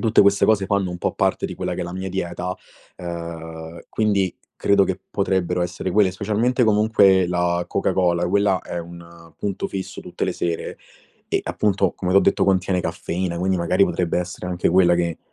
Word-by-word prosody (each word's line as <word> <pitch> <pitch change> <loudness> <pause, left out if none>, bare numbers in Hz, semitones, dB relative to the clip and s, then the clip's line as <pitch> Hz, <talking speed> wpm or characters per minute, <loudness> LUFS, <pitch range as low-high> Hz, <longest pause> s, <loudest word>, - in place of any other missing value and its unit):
tutte 110 -2 +4
queste 100 0 +4
cose 105 -3 +3
fanno 100 -3 0
un 90 - -6
po' - - -1
parte - - 0
di - - -6
quella - - -3
che - - -3
è - - -4
la 85 - -6
mia 95 +1 -4
dieta, 90 0 -3 0.4
ehm, 85 -1 -7
quindi 100 -4 +1 0.2
credo 100 -1 +3
che 95 0 -2
potrebbero 95 -3 0
essere 90 +1 -3
quelle. 100 -3 +4
Specialmente 110 +6 +1
comunque 105 -3 +4
la 90 0 0
Coca - - 0
Cola, 90 -2 +1
quella 100 0 +2
è - - -5
un 85 -1 -11
punto 100 -2 -2
fisso 95 -1 -6
tutte - - -4
le - - -1
sere 85 -1 -3 0.5
e - - +1
appunto, 100 -2 +1
come 90 -1 -2
t'ho 100 - +7
detto 100 - +2
contiene 95 -1 +2
caffeina, 85 +1 -3
quindi 95 +1 +1
magari 90 +3 +3
potrebbe 90 -1 -1
essere 90 0 -5
anche 90 -1 0
quella 90 -1 +5
che 85 -2 -1
90 Hz, 190 wpm, -22 LUFS, 85-100 Hz, 0.5 s, t'ho